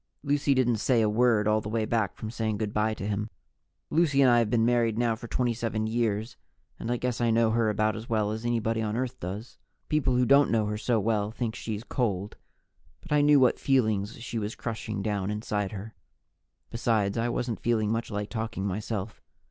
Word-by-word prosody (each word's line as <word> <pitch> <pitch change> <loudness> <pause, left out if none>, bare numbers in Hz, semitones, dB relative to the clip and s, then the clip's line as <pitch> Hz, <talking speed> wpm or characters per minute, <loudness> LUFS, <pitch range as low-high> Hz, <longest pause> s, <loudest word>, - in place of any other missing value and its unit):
Lucy 145 -1 +2
didn't 120 -3 +2
say 115 +1 +2
a - - +3
word 110 -1 +3
all 110 0 +3
the 105 - -6
way 110 0 0
back 110 -3 0
from 110 - -6
saying 110 -2 -2
good 105 -1 -3
by 110 +1 +1
to 100 - -5
him. 105 +1 -2 0.6
Lucy 155 -4 +3
and 130 -2 +6
I 120 - +5
have 115 -2 +1
been 115 -1 +2
married 120 -2 +2
now 120 -1 +1
for 115 +1 -9
27 115 -2 -1
years 110 0 -1 0.4
and 115 - -5
I 120 - +1
guess 125 -1 -2
I 120 - +2
know 115 0 +3
her 115 -1 +2
about 110 +1 +1
as 110 +1 -8
well 105 -2 +1
as 110 +1 -4
anybody 115 -1 0
on 110 0 -2
Earth 130 -1 -3
does. 100 +7 -7 0.3
People 150 -4 +2
who 125 0 +3
don't 140 +2 +5
know 110 -2 +2
her 105 0 -2
so 115 +1 +1
well 105 -1 0
think 115 0 -3
she's 110 -2 -5
cold. 105 -6 -2 0.7
But - - -15
I 150 0 +4
knew 145 0 +6
what 130 -1 +3
feelings 110 -5 +1
she 115 0 -4
was 105 +1 -4
crushing 110 -3 -4
down 100 -2 -1
inside 105 -2 -2
her. 105 +2 -7 0.8
Besides, 110 -4 +1
I 115 +1 0
wasn't 120 -1 -2
feeling 110 -3 +1
much 115 +1 -2
like 105 -1 -4
talking 110 -4 -3
myself. 105 +1 -4
110 Hz, 210 wpm, -28 LUFS, 105-120 Hz, 0.8 s, and